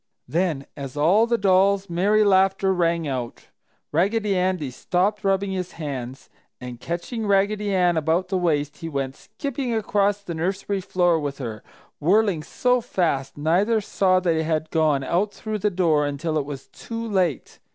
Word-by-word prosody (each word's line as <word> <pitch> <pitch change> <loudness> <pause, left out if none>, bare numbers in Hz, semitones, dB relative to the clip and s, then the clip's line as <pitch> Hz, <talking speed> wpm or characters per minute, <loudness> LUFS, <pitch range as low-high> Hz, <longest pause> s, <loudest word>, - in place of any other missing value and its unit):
Then, 160 -5 -1
as 140 -1 -7
all 190 +10 +4
the 235 0 +2
dolls' 195 0 +3
merry 200 +5 +2
laughter 195 -1 +3
rang 170 -2 +1
out, 125 -4 -5 0.4
Raggedy 200 +5 +1
Andy 180 -6 0
stopped 185 - -1
rubbing 195 0 +1
his 185 -1 -4
hands, 135 -5 -6 0.3
and 125 -1 -8
catching 190 - -4
Raggedy 205 +1 +1
Ann 180 -3 +2
about 165 +4 0
the 190 - 0
waist, 150 -4 0
he 165 - -6
went 135 -3 -3
skipping 270 -4 -4
across 205 -2 +1
the 175 - -5
nursery 190 +4 -2
floor 175 -2 +2
with 145 -2 -4
her, 115 -5 -6 0.4
whirling 190 +1 +2
so 250 +10 +1
fast 170 - -1
neither 185 +9 +2
saw 190 -3 +2
they 170 -3 +1
had 155 0 -1
gone 155 -4 +2
out 185 +9 0
through 215 -1 -4
the 210 - +1
door 165 -6 +2
until 150 +3 -3
it 140 - -3
was 140 -2 -7
too 230 0 -6
late. 185 - -1
180 Hz, 160 wpm, -23 LUFS, 155-200 Hz, 0.4 s, all